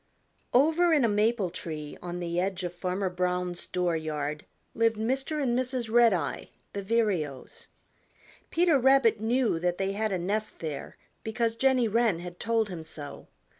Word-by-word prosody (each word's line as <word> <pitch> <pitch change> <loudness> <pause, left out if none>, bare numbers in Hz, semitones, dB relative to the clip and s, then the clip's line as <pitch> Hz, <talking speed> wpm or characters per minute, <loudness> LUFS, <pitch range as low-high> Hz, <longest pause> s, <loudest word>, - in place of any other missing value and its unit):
Over 320 +6 +4
in 290 -6 +4
a - - +4
maple 210 -2 +1
tree 155 -4 -6
on 175 0 -5
the 170 0 -2
edge 190 0 -1
of 175 -1 -3
Farmer 185 +2 -2
Brown's 180 -1 -2
door 180 -2 0
yard 150 -1 -3 0.3
lived 225 -1 +2
Mr. 265 +7 -1
and 250 -4 +1
Mrs. 250 -2 -1
Redeye 225 -10 +3 0.3
the 200 - -3
Vireos. 190 - -1 0.8
Peter 335 -4 +3
Rabbit 260 -4 +4
knew 230 -5 +1
that 175 +1 0
they 195 0 0
had 215 +1 -1
a 190 - 0
nest 205 +5 -2
there 155 -3 -6 0.2
because 225 0 -1
Jenny 255 -1 +3
Wren 225 -4 +2
had 175 +1 -8
told 225 -2 +1
him 175 -3 -6
so. 150 -2 -9
205 Hz, 160 wpm, -28 LUFS, 175-235 Hz, 0.8 s, Over